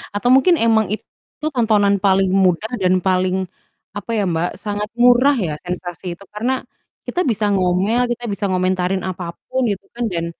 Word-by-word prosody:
Atau 225 +4 0
mungkin 335 +7 +5
emang 220 -3 +3
itu 215 - -5 0.5
tontonan 210 -4 +3
paling 195 -1 +3
mudah 190 +3 +2
dan 185 0 +2
paling 185 0 +1 0.5
apa 205 +3 -5
ya 215 -3 +1
Mbak, 170 0 0
sangat 210 0 -3
murah 250 +3 +5
ya 165 -6 -1
sensasi 175 -1 -5
itu. 200 - -16
Karena 250 +5 -1 0.5
kita 360 - -1
bisa 220 -5 0
ngomel, 190 +5 +1
kita 240 - -15
bisa 200 0 -3
ngomentarin 185 0 0
apapun 185 +7 -4
gitu 195 - -5
kan, 240 - -3
dan 170 -1 -2
200 Hz, 160 wpm, -19 LUFS, 185-225 Hz, 0.5 s, mungkin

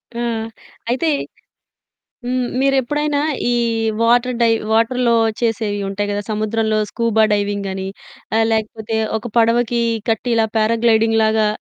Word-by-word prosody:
ఆ! - - -4 0.7
అయితే 260 +7 0 1.2
హ్మ్. 255 0 0 0.2
మీరెప్పుడైనా 285 +2 +1 0.3
ఈ - - +2 0.5
వాటర్ 240 +1 +2
డైవ్ 225 -1 +3
వాటర్‌లో 235 +1 +2 0.2
చేసేవి 220 -3 -1
ఉంటాయి 205 +1 -3
గదా! 205 0 -2
సముద్రంలో 215 0 0
స్కూబా 225 -2 +2
డైవింగ్ 205 -1 -1
అని, 190 0 -4 0.5
ఆ - - +3
లేకపోతే 220 0 -2 0.2
ఒక 220 +1 -6
పడవకి 235 +1 +2 0.3
కట్టి 225 +2 0
ఇలా 225 -1 +3
పారా 220 +1 +2
గ్లైడింగ్ 225 -1 +3
లాగా, 220 0 +2
225 Hz, 125 wpm, -19 LUFS, 215-240 Hz, 1.2 s, డైవ్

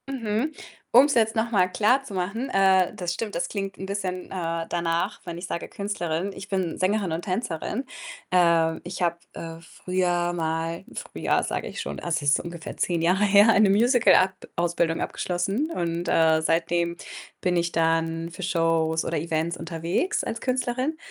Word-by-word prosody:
Mhm. 245 +1 -1 0.4
Um's 275 +4 +7
jetzt 225 -1 +2
noch 230 +1 0
mal 185 -4 +4
klarzumachen, 215 +2 0
äh, 190 -3 +4
das 175 -1 -3
stimmt, 210 +3 -4
das 170 - -1
klingt 195 -2 -4
'n 190 - -6
bisschen, 190 -2 -3
äh, 165 -3 -3
danach, 170 -1 -1
wenn 170 -1 -6
ich 175 - -6
sage 170 - -4
Künstlerin 195 -3 -3
ich 195 +2 -9
bin 185 -4 -1
Sängerin 190 -2 0
und 165 - -2
Tänzerin. 195 - -3 0.4
Ähm, 170 -2 +3
ich 175 +1 -6
habe, 170 -1 +1 0.2
äh, 165 0 -8
früher 175 0 -1
mal 165 0 -2
früher - - -1
sage - - -3
ich - - -7
schon, - - -4
also 170 -3 -1
das 145 -1 +1
ist 140 - +4
ungefähr 170 -1 -7
10 170 -2 0
Jahre 180 +4 +3
her, 205 +1 +6
eine 215 -2 +5
Musical 225 0 +5
akt 185 0 +1
Ausbildung 170 -1 +1
abgeschlossen 195 - -2
und, 170 - -2
äh, 160 -1 +4
seitdem 170 +1 0 0.4
bin 180 -1 0
ich 170 0 +1
dann 165 0 0
für 180 +3 -8
Shows 165 -2 +1
oder 165 - -1
Events 165 +2 -1
unterwegs 170 - -1
als 230 - -4
Künstlerin 255 +3 -1
180 Hz, 170 wpm, -25 LUFS, 165-200 Hz, 0.4 s, Um's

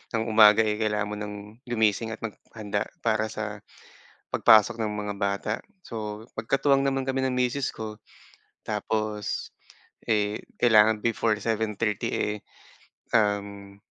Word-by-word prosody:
ng 110 - +1
umaga, 110 -1 +6
eh, 105 -1 -1
kailangan 105 -1 0
mo - - -3
ng 105 -1 -5 0.3
gumising 110 -1 +1
at 115 - -18
maghanda 105 -1 -4 0.2
para 110 -1 +1
sa 105 -1 -5 0.7
pagpasok 110 +1 +5
ng 110 -2 -1
mga 105 0 -3
bata. 100 +1 -1 0.3
So, 105 -4 -6 0.2
magkatuwang 135 +4 +2
naman 135 -1 0
kami 135 0 -1
ng 130 - -2
misis 125 +2 0
ko. 110 -1 -6 0.7
Tapos, 110 -1 -2 0.6
eh, 105 -1 +1 0.2
kailangan 110 -2 +5
before 115 -1 +1
7:30, 110 -1 -1
eh, 105 - 0 0.8
um, 100 -2 0
110 Hz, 125 wpm, -26 LUFS, 105-115 Hz, 0.8 s, umaga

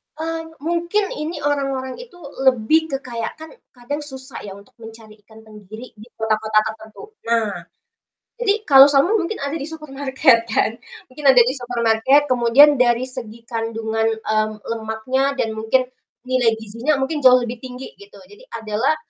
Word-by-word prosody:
Mmm, 325 +1 -4 0.2
mungkin 345 +5 -1
ini 310 +1 -5
orang-orang 275 - -2
itu 475 -6 -12 0.3
lebih 260 +6 +3
ke 275 - -2
kayak 230 -2 -5
kan 315 0 -12 0.2
kadang 250 +4 -5
susah 265 -3 -7
ya 195 - -8
untuk 200 0 -17
mencari 225 -1 -13
ikan 220 0 -16
tenggiri 215 +2 -12
di 215 - -12
kota-kota 220 -1 +1
tertentu. 220 - -14 0.2
Nah, 230 -2 +1 0.9
jadi 425 -2 0
kalau 275 -6 +8
salmon 290 +10 +3
mungkin 365 +4 -3
ada 280 - -3
di 280 - -5
supermarket 270 -5 +1
kan. 220 - +1 0.4
Mungkin 295 +3 -10
ada 260 -2 +8
di 245 - 0
supermarket, 245 +3 +2
kemudian 255 +4 +5
dari 240 -1 +3
segi 235 -3 -6
kandungan, 225 -1 -2
mmm, 215 0 0
lemaknya 230 +5 -2
dan 225 -4 -1
mungkin 220 +4 +1 0.4
nilai 255 -3 +1
gizinya 230 +7 -2
mungkin 275 +3 -2
jauh 255 -2 +5
lebih 235 0 -6
tinggi 255 +1 -9
gitu. 405 +3 -16
Jadi 485 +5 -18
adalah 225 +6 -1
255 Hz, 155 wpm, -20 LUFS, 225-290 Hz, 0.9 s, kalau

